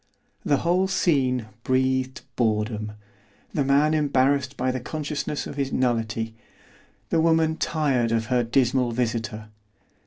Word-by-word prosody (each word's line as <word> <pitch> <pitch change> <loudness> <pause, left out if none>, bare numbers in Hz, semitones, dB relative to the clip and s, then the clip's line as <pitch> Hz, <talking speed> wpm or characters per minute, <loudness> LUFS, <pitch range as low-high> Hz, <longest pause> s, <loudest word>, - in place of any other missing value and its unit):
The 145 - +2
whole 180 +3 +3
scene 135 - +1 0.2
breathed 130 0 0
boredom, 110 -2 -1 0.6
the 145 - +1
man 140 +3 +3
embarrassed 140 -2 +1
by 130 +1 0
the 130 - -3
consciousness 150 +2 -3
of - - -7
his 135 -1 -1
nullity, 115 -3 -1 0.7
the 165 - +2
woman 160 -1 +3
tired 135 -8 0
of 115 -1 +1
her 125 0 +1
dismal 125 0 +1
visitor. 115 -2 -2
130 Hz, 125 wpm, -25 LUFS, 115-145 Hz, 0.7 s, whole